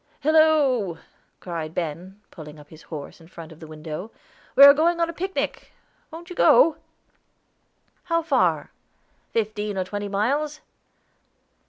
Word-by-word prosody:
"Hillo!" 290 - +3 0.4
cried 165 -3 -6
Ben, 175 +4 -5
pulling 155 -2 -11
up 150 -1 -16
his 160 0 -15
horses 155 +1 -9
in 165 - -16
front 165 -2 -11
of 160 - -14
the 160 - -11
window. 155 +5 -7 0.5
"We 275 - +8
are 280 0 +11
going 335 +3 +1
on 335 0 0
a - - -15
picnic. 380 +3 -4 0.4
Wont 340 +3 -11
you - - -7
go?" 330 -6 +5 1.3
"How 335 -1 0
far?" 330 - +1 0.6
"Fifteen 210 -2 -3
or 185 - 0
twenty 205 +2 -5
miles." 285 +10 -1
205 Hz, 140 wpm, -23 LUFS, -, 1.3 s, are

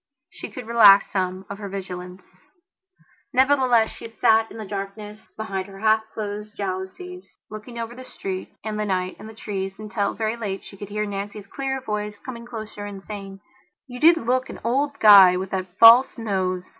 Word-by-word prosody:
She - - -8
could 250 - -9
relax 210 -4 +6
some 185 0 -2
of 200 0 -8
her 200 -2 -6
vigilance. 180 -1 -7 1.1
Nevertheless, 255 -4 +3
she - - -9
sat 225 0 +2
in - - -11
the 220 - -6
darkness 205 +2 -7
behind 195 -3 -4
her 195 -1 -12
half 220 +1 +3
closed 210 0 -6
jalousies, 200 - -6
looking 215 +3 -9
over 230 0 -5
the 255 +1 -10
street 190 -6 -6
and 215 0 -4
the 210 - -1
night 185 -2 -2
and 215 - -10
the 220 - -12
trees 195 -3 -5
until, 210 -1 -3
very 220 0 -2
late, 205 -4 -5
she - - -12
could 205 0 -9
hear 210 +1 -2
Nancy's 200 0 -6
clear 270 -1 -4
voice 210 -4 -4
coming 235 0 -9
closer 215 -3 -7
and 200 -1 -8
saying: 195 -2 -8 0.4
"You 250 -1 -9
did 330 +3 +6
look 255 0 -1
an - - -8
old 280 +4 0
guy 195 -4 +8
with 190 +1 -5
that 185 -1 -4
false 235 +4 +8
nose." 185 -5 -2
210 Hz, 180 wpm, -23 LUFS, 195-230 Hz, 1.1 s, guy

